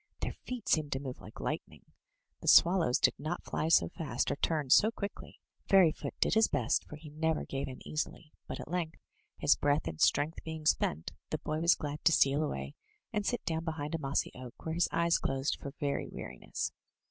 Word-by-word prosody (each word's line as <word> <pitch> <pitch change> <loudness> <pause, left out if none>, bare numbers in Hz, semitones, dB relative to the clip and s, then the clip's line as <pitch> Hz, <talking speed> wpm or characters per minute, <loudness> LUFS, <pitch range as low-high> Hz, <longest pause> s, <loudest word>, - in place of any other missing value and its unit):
Their - - -2
feet 250 -4 -5
seemed 155 -2 +2
to 135 - -1
move 130 -2 -7
like - - -12
lightning; - - -4 0.6
the - - -8
swallows 170 -7 +6
did - - +4
not 155 +4 -3
fly 155 - -2
so 165 - +5
fast 145 -7 -2
or - - 0
turn 150 -4 0
so 210 +8 +7
quickly. 205 -3 -7 0.3
Fairyfoot 180 -5 +4
did - - +2
his 220 +1 +5
best, 120 -3 0
for - - -9
he 150 0 -11
never 160 +1 0
gave 135 0 -3
in 130 -1 -9
easily, 155 0 -4
but - - -5
at - - -7
length, 165 -1 -2 0.4
his - - +4
breath 145 - +1
and 80 -1 -5
strength 150 +3 +2
being 160 -1 -6
spent, 80 - +1 0.2
the - - -1
boy 155 +1 -3
was 170 +1 +5
glad 145 0 -5
to - - +7
steal 140 -1 +4
away, 70 - -3 0.4
and 210 -1 -1
sit 245 - -1
down 160 0 -1
behind 155 -2 -4
a 165 - -1
mossy 135 -2 -1
oak, 125 -1 -9
where 160 - -2
his 170 +1 +2
eyes 170 0 +2
closed 135 +1 -1
for 140 - -5
very 140 -2 -1
weariness. - - -5
155 Hz, 205 wpm, -32 LUFS, 140-165 Hz, 0.6 s, so